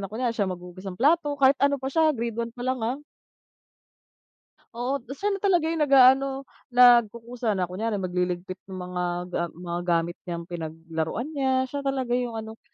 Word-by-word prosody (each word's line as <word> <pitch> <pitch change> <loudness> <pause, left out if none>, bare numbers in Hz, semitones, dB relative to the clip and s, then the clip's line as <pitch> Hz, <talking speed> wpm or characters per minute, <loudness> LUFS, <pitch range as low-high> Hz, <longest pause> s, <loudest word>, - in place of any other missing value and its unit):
na 195 - -4
kunwari 235 +2 -1 0.2
maghugas 180 +1 -12
ng 180 - -7
plato 290 - +2
kahit 275 -1 +5
ano 280 0 +3
pa 265 -1 -6
siya 320 +1 +4
grade 235 0 -3
1 230 - -2
pa 245 - -6
lang, 255 -1 -1
ah. 235 +5 -1 1.8
Oo, 250 +4 -1
'tas 260 +2 -9
siya 415 - +2
na 395 - -2
talaga 365 -5 +2
yung 330 - -2
nag-aano, 270 -1 +5 0.3
nagkukusa 235 -1 +4
na 185 - 0
kunyari 215 +4 -2
magliligpit 180 -1 -2
ng 190 - -8
mga 180 -1 -4 0.5
mga 175 0 -4
ga 170 - +4
gamit 175 +1 -7
niyang 170 -1 -4
pinaglaruan 165 - -4
niya 265 -3 +1
siya 285 - -3
talaga 270 -3 -2
yung 245 -1 0
ano. 220 0 -7
235 Hz, 175 wpm, -26 LUFS, 180-270 Hz, 1.8 s, kahit